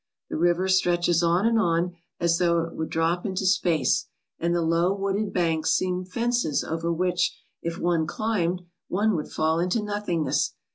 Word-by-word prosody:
The - - -2
river 175 +3 +2
stretches 175 -2 +2
on 175 +4 +2
and 230 -1 +3
on 170 -2 +1 0.3
as 170 -1 +2
though 170 -1 +3
it 165 - -7
would 160 - -4
drop 165 +2 0
into 190 -1 -2
space, 175 -7 +2 0.3
and 170 +1 0
the 170 - +1
low 165 +3 +2
wooded 200 +1 -1
banks 165 -3 +1
seem 185 0 0
fences 235 - 0
over 165 +1 -2
which, 180 +1 0 0.2
if 170 0 -4
one 170 -2 +1
climbed, 185 -5 -1 0.2
one 210 +3 +1
would 150 - -3
fall 160 +1 +1
into 180 +6 0
nothingness. 205 -6 -1
175 Hz, 170 wpm, -25 LUFS, 165-190 Hz, 0.3 s, and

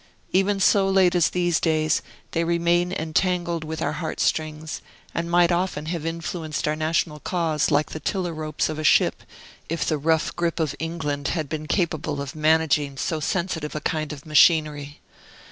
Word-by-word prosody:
Even 195 +2 +2
so 195 0 +4
late 190 -2 +4
as 175 -3 +3
these 175 -2 +1
days, 155 -2 +1 0.3
they 165 - 0
remain 170 +1 +1
entangled 170 0 0
with 160 0 -4
our - - 0
heart 160 -3 -4
strings, 155 0 -1 0.3
and 170 0 -2
might 175 0 +4
often 175 -4 -1
have 165 -1 -3
influenced 165 -2 -3
our 150 - +1
national 155 0 -1
cause 165 -3 0
like 150 0 +1
the 155 - -5
tiller 180 +1 -2
ropes 155 -1 -2
of 155 0 -4
a - - -3
ship, - - +3 0.5
if 165 +1 -1
the 155 -2 0
rough 160 +2 +1
gripe 170 -1 -1
of 155 -3 0
England 155 -4 -3
had 160 -4 -2
been 155 +1 -5
capable 160 -5 -1
of 140 +1 -5
managing 155 -2 +2
so 160 +3 -1
sensitive 160 -2 -2
a - - -1
kind 155 0 -2
of 145 -2 -9
machinery. 150 -2 +3
160 Hz, 175 wpm, -24 LUFS, 155-170 Hz, 0.5 s, so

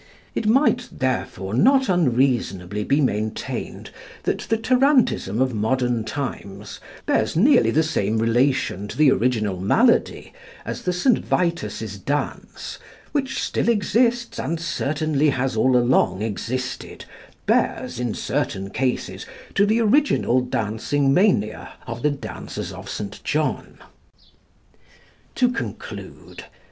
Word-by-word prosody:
It 215 - -2
might, 245 +1 +3
therefore, 115 -7 -2
not 265 - +4
unreasonably 120 - +1
be 140 +7 +2
maintained 110 -5 -3 0.3
that - - -1
the 225 - +2
tarantism 250 - +2
of 130 -1 +1
modern 120 +1 0
times 105 - -6 0.3
bears - - +1
nearly 240 - +5
the 160 - +3
same 110 -8 0
relation 115 -3 +1
to - - -8
the 150 -3 +6
original 110 -7 0
malady 230 - +2 0.3
as - - -5
the 180 - -1
St. 215 +7 +2
Vitus's 110 - -2
dance 145 +8 -4 0.3
which 270 -3 -1
still - - 0
exists, 235 +2 +1
and 160 +5 -2
certainly 155 -2 0
has 130 -2 -1
all 125 +3 +3
along 120 -6 +2
existed, 125 +4 -4 0.4
bears, - - 0
in 120 -3 -2
certain 95 +1 -2
cases, 130 -2 -2 0.3
to 200 +1 +3
the 220 +2 +2
original 225 - +3
dancing 125 +4 0
mania 140 - +1
of 115 +1 -6
the 150 - +3
dancers 140 -1 -6
of - - -9
St. - - -6
John. - - -2 1.6
To 250 -1 +3
conclude. - - -7
130 Hz, 120 wpm, -22 LUFS, -, 1.6 s, the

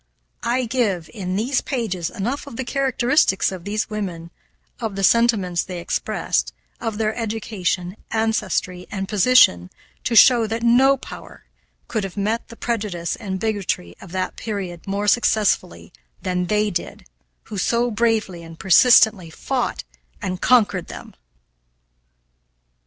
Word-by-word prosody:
I 245 +2 0
give, 215 -8 -1
in 185 -4 -4
these 245 +7 0
pages, 215 - -3
enough 245 +9 -4
of 270 - -9
the 260 - -3
characteristics 260 -6 +2
of 185 -2 -8
these 210 +1 -1
women, 180 -6 -5 0.5
of 220 -4 -4
the 195 - -3
sentiments 200 -5 +3
they 180 -2 -6
expressed, - - -1 0.3
of 225 -2 -3
their 215 0 0
education, 205 -5 -2
ancestry, 210 -5 -1
and 195 -1 -4
position 200 - +4 0.4
to 230 - 0
show 235 -1 +7
that 225 +1 -3
no 260 +4 +5
power - - -11 0.4
could 220 -3 -2
have 195 0 -6
met 215 +3 -1
the 230 - -12
prejudice 205 -9 -3
and 190 -3 -5
bigotry 200 - -2
of 190 - -12
that 185 0 -3
period 195 -6 -5
more 200 +1 -2
successfully 205 -5 +1 0.3
than 180 -1 -1
they 210 +1 +1
did 175 - -5 0.4
who 205 - -6
so 235 +5 +1
bravely 220 -5 0
and 165 -1 -11
persistently 195 -1 +5
fought 160 - -3 0.4
and 185 -1 -4
conquered 210 -7 +3
them. - - -10
210 Hz, 135 wpm, -21 LUFS, 185-230 Hz, 0.5 s, show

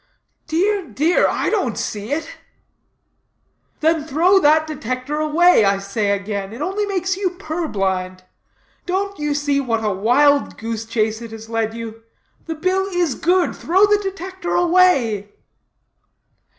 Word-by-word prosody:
"Dear, 375 +4 0
dear, 295 +10 +2
I - - -1
don't 370 - -1
see 210 +3 -4
it." 310 +2 -2 1.5
"Then 320 0 +2
throw 335 +6 +3
that 310 -1 +4
Detector 265 0 -4
away, 310 -2 +4
I 200 0 +3
say 200 +1 -2
again; 200 0 -3
it 235 - -9
only 390 +6 -2
makes 380 -2 -1
you 390 -2 0
purblind; 195 - -3 0.6
don't 395 +1 -2
you 295 -1 -1
see 285 -1 0
what 230 -4 -1
a 210 - +1
wild 275 +9 +2
goose 225 0 -4
chase 220 0 -1
it 230 - -8
has 225 0 -10
led 225 -1 -1
you? 225 -1 -7 0.5
The 325 - -3
bill 370 +4 0
is 355 -6 0
good. 355 +6 +1
Throw 375 +5 +3
the 415 0 +3
Detector 375 -2 -4
away." 335 - +3
295 Hz, 140 wpm, -20 LUFS, 225-360 Hz, 1.5 s, that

